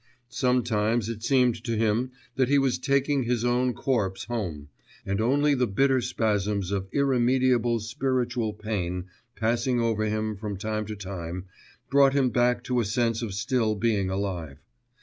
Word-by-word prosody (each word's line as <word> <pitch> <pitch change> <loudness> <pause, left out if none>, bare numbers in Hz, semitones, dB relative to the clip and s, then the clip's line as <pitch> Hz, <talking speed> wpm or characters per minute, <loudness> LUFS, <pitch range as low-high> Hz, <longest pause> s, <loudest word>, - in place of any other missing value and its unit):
Sometimes 120 -3 +1
it 110 -2 -5
seemed 125 -2 +2
to 115 -2 -2
him 115 +3 +1 0.3
that 130 -1 +2
he 145 - +4
was 135 -3 +1
taking 140 +1 +1
his 120 -1 0
own 125 0 +1
corpse 110 -7 -1
home, 90 -11 -4 0.4
and 100 +2 -1
only 145 +5 +3
the 125 -2 +1
bitter 130 +5 +2
spasms 105 -5 -1
of 95 -1 -2
irremediable 125 -3 +2
spiritual 120 +1 -1
pain 90 -4 -3 0.3
passing 120 +2 0
over 115 -2 +1
him 110 0 -1
from 100 -1 -5
time 110 +1 -3
to 110 - -5
time 95 -2 -6 0.5
brought 140 -1 +5
him 135 -3 +2
back 120 +1 +2
to 125 -1 0
a - - +2
sense 115 +2 0
of 105 -5 -4
still 110 +2 0
being 105 -3 0
alive. 90 -7 -3
115 Hz, 155 wpm, -26 LUFS, 105-125 Hz, 0.5 s, brought